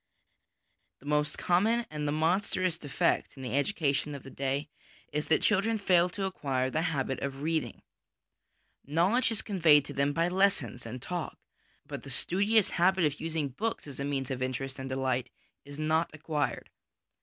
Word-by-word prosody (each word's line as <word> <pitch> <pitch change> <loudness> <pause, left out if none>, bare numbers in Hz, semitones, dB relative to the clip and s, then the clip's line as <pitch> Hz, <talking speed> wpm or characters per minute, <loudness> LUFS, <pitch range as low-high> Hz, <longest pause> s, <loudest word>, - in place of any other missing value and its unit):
The - - -17
most 150 0 +1
common 220 +7 +2
and 150 -1 -3
the - - +1
monstrous 175 +3 +1
defect 145 -2 0
in 135 - -8
the 125 - -3
education 145 -2 0
of 140 - -9
the 135 - -10
day 135 +2 -2 0.5
is 150 +1 -1
that 160 - +3
children 215 +2 +2
fail 180 -3 +3
to 195 +2 -3
acquire 135 -8 -1
the 155 - 0
habit 140 -6 -1
of 140 0 -4
reading. 160 0 -1 1.0
Knowledge 180 - +2
is 225 - 0
conveyed 160 -8 +5
to 145 - -7
them 140 +1 +1
by 165 +3 +1
lessons 185 -10 +1
and 125 +2 -7
talk, 175 -6 -4 0.5
but - - -6
the - - -10
studious 205 +3 +2
habit 180 0 +3
of 150 -1 -1
using 160 -3 -2
books 220 - -3
as 140 -3 -9
a - - -1
means 140 -2 -2
of 130 -1 -3
interest 130 +1 -3
and 130 0 -5
delight 130 -1 -1 0.4
is 145 0 -10
not 155 +2 +1
acquired. 150 -2 -2
150 Hz, 170 wpm, -30 LUFS, 140-180 Hz, 1.0 s, conveyed